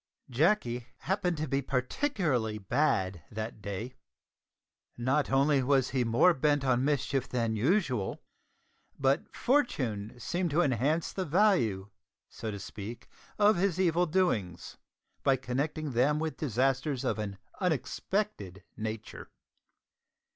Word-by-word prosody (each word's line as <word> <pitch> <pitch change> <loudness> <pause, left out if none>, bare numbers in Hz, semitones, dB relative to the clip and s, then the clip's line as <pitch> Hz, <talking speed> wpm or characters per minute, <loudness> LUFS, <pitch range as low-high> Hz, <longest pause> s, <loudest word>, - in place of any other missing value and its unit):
Jacky 125 - +1
happened 180 +1 0
to 155 +1 -2
be 135 +1 0
particularly 130 - -1
bad 95 - 0
that 110 0 -6
day. 100 +6 -5 1.0
Not 130 +5 +1
only 140 +1 +3
was 130 0 +2
he 130 -2 +1
more 120 +10 +4
bent 145 -1 +1
on 130 -1 +2
mischief 135 -2 0
than 115 -3 0
usual, 130 - +1 0.8
but 135 +1 +1
Fortune 125 - 0
seemed 175 +6 -1
to 160 +4 +3
enhance 145 +5 0
the 190 - -2
value, 145 - +2 0.4
(so 110 - -5
to 100 - -4
speak), 105 +3 -8 0.3
of 210 -1 +5
his 185 -1 +1
evil 175 -1 +3
doings, 115 - 0 0.5
by 135 - +4
connecting 140 +4 -2
them 130 +5 +2
with 160 0 -2
disasters 135 +1 0
of - - -1
an 100 -2 -4 0.2
unexpected 160 - -2
nature. 110 0 -6
135 Hz, 120 wpm, -30 LUFS, 115-160 Hz, 1.0 s, of